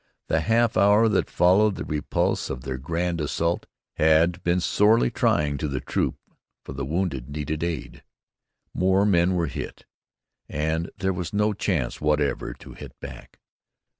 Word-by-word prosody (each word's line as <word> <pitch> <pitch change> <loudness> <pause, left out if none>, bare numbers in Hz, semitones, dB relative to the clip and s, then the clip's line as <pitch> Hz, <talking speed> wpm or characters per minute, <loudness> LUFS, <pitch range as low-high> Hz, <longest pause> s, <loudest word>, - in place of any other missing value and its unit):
The 80 - +2
half 115 +4 +2
hour 105 +4 +5
that 105 - +1
followed 95 +4 +4
the - - -5
repulse 75 -1 -1
of 65 - -4
their 65 -1 -4
grand 85 +4 -2
assault 85 +3 -1 0.3
had 80 +3 +3
been 85 +1 +1
sorely 105 - +3
trying 70 -2 +1
to 75 - -1
the 70 -2 -2
troop, - - -1 0.5
for - - -7
the 70 0 -4
wounded 75 -6 -2
needed 75 +2 -3
aid, 85 -6 -4 0.7
more 95 +2 +2
men 90 -2 +3
were 85 -2 +1
hit, - - -7 0.6
and 80 +3 -1
there 95 0 0
was 90 0 -5
no 105 +1 +2
chance 85 - -2
whatever 75 -1 0
to - - -13
hit - - -11
back. - - -10
85 Hz, 155 wpm, -25 LUFS, 75-95 Hz, 0.7 s, hour